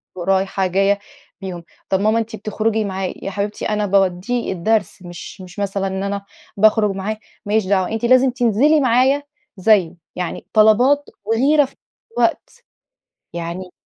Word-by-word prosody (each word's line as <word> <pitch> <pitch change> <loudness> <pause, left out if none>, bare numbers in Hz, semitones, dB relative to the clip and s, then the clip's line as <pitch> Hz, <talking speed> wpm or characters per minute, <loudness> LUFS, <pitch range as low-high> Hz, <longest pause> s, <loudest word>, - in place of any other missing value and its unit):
ورايحة 190 +1 0
جاية 195 +2 +2 0.4
بيهم، 180 -3 -6 0.3
طب 190 - +2
ماما 215 +2 +2
أنتِ 225 -1 -4
بتخرجي 215 +1 -1
معاه، 190 -1 -3
يا 195 - -4
حبيبتي 205 +1 -3
أنا 210 -1 0
باودِّيه 195 +4 0
الدرس، 205 +3 0
مش 175 +2 -10
مش 185 +1 -10
مثلًا 195 -1 -1
إن 190 +1 -3
أنا 200 0 -3 0.3
باخرج 215 0 +4
معاه، 195 +3 -3 0.3
ماليش 210 0 +1
دعوة، 190 -2 +1
أنتِ 225 +2 -2
لازم 255 +1 +5
تنزلي 245 +6 +3
معايا 260 +2 +3 0.3
زيه، 185 -3 +3 0.2
يعني 180 -2 -4
طلبات 245 +7 +4 0.2
وغيرة 275 +7 +3
في 270 - -16
نفس - - -71 0.3
الوقت - - -1 0.7
يعني 170 +2 -5
205 Hz, 145 wpm, -19 LUFS, 190-225 Hz, 0.7 s, لازم